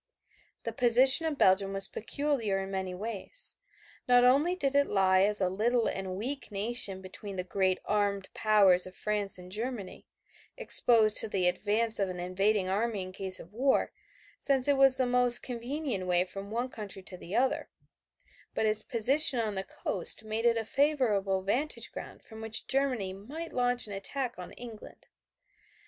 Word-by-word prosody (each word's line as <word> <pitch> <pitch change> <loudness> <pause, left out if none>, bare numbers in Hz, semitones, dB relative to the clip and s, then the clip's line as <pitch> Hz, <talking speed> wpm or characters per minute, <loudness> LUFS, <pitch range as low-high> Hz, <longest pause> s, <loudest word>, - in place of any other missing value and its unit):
The - - -6
position 260 +5 +5
of 300 -3 -4
Belgium 195 -1 +2
was 195 0 +3
peculiar 235 -4 -3
in 195 0 -6
many 190 -1 -5
ways. 225 - -5 0.5
Not 245 0 +4
only 290 +8 +2
did 280 -7 -2
it 285 0 +2
lie 190 -1 +1
as 210 +1 +3
a 185 - 0
little 225 +6 -1
and 190 -1 -5
weak 260 +4 -6
nation 200 -2 +2
between 195 +1 -10
the 180 - -4
great 185 0 -1
armed 200 -2 -2
powers 195 -4 +2
of 185 - -14
France 205 -1 -1
and 180 0 -13
Germany, 220 -1 -6 0.5
exposed 230 - +4
to - - +8
the 185 -3 -1
advance 215 +5 -1
of 195 -2 -1
an 180 -1 -7
invading 190 +2 -1
army 205 +1 -3
in 185 - -10
case 190 0 +2
of 175 - -14
war, 265 +4 0 0.5
since 270 -2 +1
it 285 - +2
was 270 -1 +4
the 255 - +1
most 245 -1 +6
convenient 245 -4 -5
way 180 0 +1
from 195 +2 -10
one 240 +4 -4
country 200 -3 -9
to 185 - -10
the 180 +1 -9
other, 260 +2 -1 0.9
but - - -1
its 215 0 +1
position 255 +5 +4
on 220 -2 -3
the 190 -1 -5
coast 195 +2 0
made 220 +1 -5
it 230 -1 +1
a 225 - -4
favorable 215 -9 -1
vantage 260 +10 -3
ground - - -11
from 220 -1 -13
which 220 0 0
Germany 255 -8 +1
might 285 - -10
launch 245 0 +1
an 205 - -9
attack 240 +4 -5
on 180 - -10
England. 230 -3 -13
215 Hz, 175 wpm, -28 LUFS, 195-250 Hz, 0.9 s, to